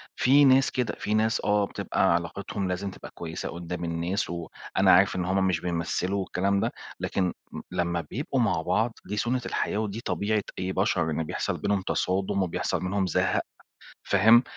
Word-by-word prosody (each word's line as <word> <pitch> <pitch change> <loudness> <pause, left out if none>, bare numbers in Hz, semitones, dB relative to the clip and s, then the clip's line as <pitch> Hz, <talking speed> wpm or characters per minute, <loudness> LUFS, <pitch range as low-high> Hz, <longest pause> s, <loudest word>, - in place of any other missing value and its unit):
في 140 +3 +5
ناس 135 0 +5
كده، 125 -3 -1
في 105 - -1
ناس 110 +1 +2
آه 105 -1 +3
بتبقى 85 - +1
علاقتهم 95 +3 -2
لازم 95 +2 -2
تبقى - - -11
كويسة 80 -1 -5
قدّام 85 0 -5
الناس، 85 +4 -1
وأنا 85 +3 0
عارف 95 +1 +5
إن 90 -1 -1
هُم 95 0 +2
مش 90 -3 +1
بيمثّلوا 90 +3 -1
والكلام 100 +1 0
ده، - - 0 0.3
لكن 90 -2 0 0.2
م - - -6
لمّا 85 -1 0
بيبقوا 135 +1 -1
مع 95 -8 +1
بعض 110 +8 +1
دي 105 +2 -4
سُنّة 120 +4 0
الحياة - - -1
ودي 110 +1 -2
طبيعة 105 -1 0 0.2
أي 95 0 -1
بشر 80 - +1
إن 80 +1 -1
بيحصل - - -2
بينهم 100 -2 0
تصادم 95 +1 0
وبيحصل 90 +1 -1
منهم 95 0 0
زهق 90 +2 +1 0.6
فاهم، 110 +5 +6
95 Hz, 175 wpm, -27 LUFS, 90-105 Hz, 0.6 s, فاهم